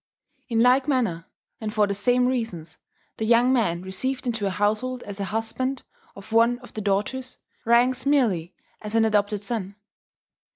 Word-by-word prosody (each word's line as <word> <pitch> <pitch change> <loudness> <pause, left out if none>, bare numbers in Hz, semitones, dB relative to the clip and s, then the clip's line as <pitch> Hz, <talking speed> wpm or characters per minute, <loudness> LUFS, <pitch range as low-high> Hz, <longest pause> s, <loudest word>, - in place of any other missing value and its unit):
In 225 -1 +2
like 255 +2 +4
manner, 230 - 0 0.3
and 220 -1 -4
for 210 -1 +3
the 200 - -2
same 245 +5 +2
reasons, 225 -11 -3 0.4
the - - -3
young 240 +3 +4
man 180 -8 +1
received 255 +9 -3
into 225 -4 -1
a - - +1
household 215 +6 -1
as 205 0 -6
a 200 - -1
husband 225 +5 -2 0.3
of 195 +2 -12
one 230 +2 +4
of 245 - -14
the 215 - -4
daughters, 215 +6 -2 0.3
ranks 245 +2 +3
merely 225 - +1 0.3
as 210 +1 -5
an 225 0 +4
adopted 210 -1 +1
son. 200 -3 -4
225 Hz, 165 wpm, -24 LUFS, 200-250 Hz, 0.4 s, like